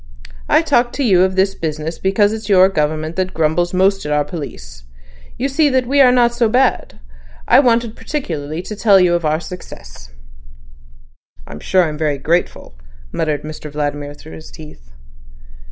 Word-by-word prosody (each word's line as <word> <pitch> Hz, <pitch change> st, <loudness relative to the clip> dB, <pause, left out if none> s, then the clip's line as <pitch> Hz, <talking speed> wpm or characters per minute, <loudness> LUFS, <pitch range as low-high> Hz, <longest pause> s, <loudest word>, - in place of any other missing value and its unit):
I -, -, +4 dB
talked 240 Hz, 0 st, +1 dB
to 285 Hz, -, -1 dB
you 190 Hz, -7 st, +4 dB
of 190 Hz, 0 st, +1 dB
this 190 Hz, +1 st, +2 dB
business 155 Hz, 0 st, -5 dB
because 205 Hz, +2 st, +1 dB
it's 220 Hz, -1 st, -7 dB
your 190 Hz, -1 st, +5 dB
government 155 Hz, -1 st, -2 dB
that 185 Hz, 0 st, -2 dB
grumbles 165 Hz, +2 st, 0 dB
most 195 Hz, +1 st, +1 dB
at 150 Hz, -, -4 dB
our 150 Hz, 0 st, +1 dB
police. 65 Hz, -, -9 dB, 0.5 s
You 265 Hz, -, -1 dB
see 290 Hz, +2 st, +2 dB
that 260 Hz, -2 st, +1 dB
we 280 Hz, +3 st, +3 dB
are 255 Hz, -2 st, +6 dB
not 240 Hz, -1 st, +3 dB
so 240 Hz, -2 st, +1 dB
bad. 255 Hz, +3 st, 0 dB, 0.5 s
I 250 Hz, -, +6 dB
wanted 235 Hz, -4 st, +1 dB
particularly 160 Hz, -, -5 dB
to 215 Hz, -, -7 dB
tell 200 Hz, -2 st, +4 dB
you 180 Hz, -1 st, +3 dB
of 170 Hz, -1 st, -1 dB
our 155 Hz, +1 st, +1 dB
success." 65 Hz, -, -11 dB, 1.4 s
"I'm 75 Hz, -, -10 dB
sure 185 Hz, -, +2 dB
I'm 155 Hz, -2 st, -4 dB
very 150 Hz, -3 st, 0 dB
grateful," 165 Hz, -, -2 dB, 0.4 s
muttered 150 Hz, -3 st, -2 dB
Mr 155 Hz, -1 st, -8 dB
Vladimir 145 Hz, 0 st, -4 dB
through 155 Hz, +2 st, -13 dB
his 155 Hz, -, -11 dB
teeth. 150 Hz, -, -14 dB
175 Hz, 170 wpm, -17 LUFS, 150-215 Hz, 1.4 s, are